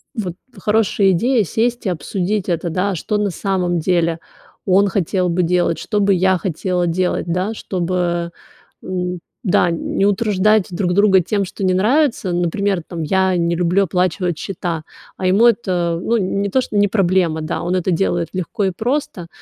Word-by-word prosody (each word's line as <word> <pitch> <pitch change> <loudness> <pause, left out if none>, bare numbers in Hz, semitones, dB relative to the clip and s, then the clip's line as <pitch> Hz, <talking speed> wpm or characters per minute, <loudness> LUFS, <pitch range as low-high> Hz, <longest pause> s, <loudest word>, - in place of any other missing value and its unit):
вот 195 -7 -3 0.2
хорошая 210 -1 +2
идея 230 +5 +2
сесть 235 +8 -1
и - - +1
обсудить 185 +4 -2
это, 170 0 -1
да, 185 +4 -1
что 210 +5 -2
на 205 -2 0
самом 180 -2 -1
деле 170 0 +1 0.5
он 195 +1 +4
хотел 185 -1 0
бы 175 +1 +1
делать, 175 -1 +1
что 210 - -2
бы 200 -1 +3
я 185 0 +3
хотела 180 +1 -1
делать, 180 +2 0
да, 180 +5 -1
чтобы, 175 -3 -2 0.5
м, 180 -1 -3 0.2
да, 180 -2 +3
н 170 - -3
не 195 - +3
утруждать 210 0 +2
друг 180 0 -1
друга 200 -1 +5
тем, 200 +3 -1
что 190 - -7
не 185 -1 +2
нравится. 225 - +1
Например, 175 +2 0
там, 165 -2 -5
я 190 +2 +1
не 170 0 +1
люблю 180 +3 +2
оплачивать 180 -1 0
счета, 170 -3 -4 0.3
а 185 - -1
ему 200 +6 +5
это, 180 -7 +1
ну, 235 0 +1
не 200 0 -1
то, 260 - +2
что 220 - -6
не 205 0 +4
проблема, 180 -5 +1
да, 155 - -3
он 175 +2 -1
это 185 0 0
делает 175 -1 0
легко 185 +3 -2
и 190 - +1
просто. 245 - -3
185 Hz, 175 wpm, -19 LUFS, 175-200 Hz, 0.5 s, друга